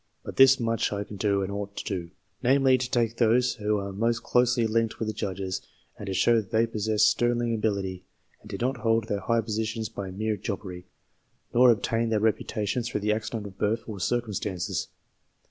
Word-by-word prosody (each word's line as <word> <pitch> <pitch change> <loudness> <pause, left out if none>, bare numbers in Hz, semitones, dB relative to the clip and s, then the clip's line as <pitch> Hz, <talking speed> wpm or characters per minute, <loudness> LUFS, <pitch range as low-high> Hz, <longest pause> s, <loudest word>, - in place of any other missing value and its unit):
But - - -8
this 135 0 +7
much 115 -1 0
I 100 0 -2
can 105 - -10
do, 100 -1 +1
and 95 - -4
ought 100 0 -5
to - - -3
do; 90 -4 -4 0.3
namely, 135 +1 +4
to 125 -1 -2
take 115 -2 0
those 120 +2 +3
who 105 0 0
are 100 -1 -4
most 115 +3 0
closely 125 -1 +2
linked 115 0 0
with 110 - -3
the 110 - -2
Judges, 95 -3 -3 0.3
and 100 - -9
to 95 - -2
show 120 +5 +4
that 105 -4 -2
they 115 0 +3
possessed 110 -1 +2
sterling 120 -1 +1
ability, 100 -4 -2 0.3
and - - -14
did - - -6
not 130 +2 0
hold 115 -1 +1
their 100 - -1
high 115 +2 +1
positions 110 0 -3
by 100 -4 -6
mere 105 +3 -2
jobbery, 95 -3 -6 0.7
nor 125 +1 +6
obtain 115 +1 +1
their 110 -1 +2
reputa 105 -1 0
tions 120 +4 -1
through 105 - -2
the 105 +1 +2
accident 110 0 -4
of 95 -1 -10
birth 110 +2 0
or 105 -3 -7
circumstances. 105 -4 -2
110 Hz, 200 wpm, -27 LUFS, 100-115 Hz, 0.7 s, this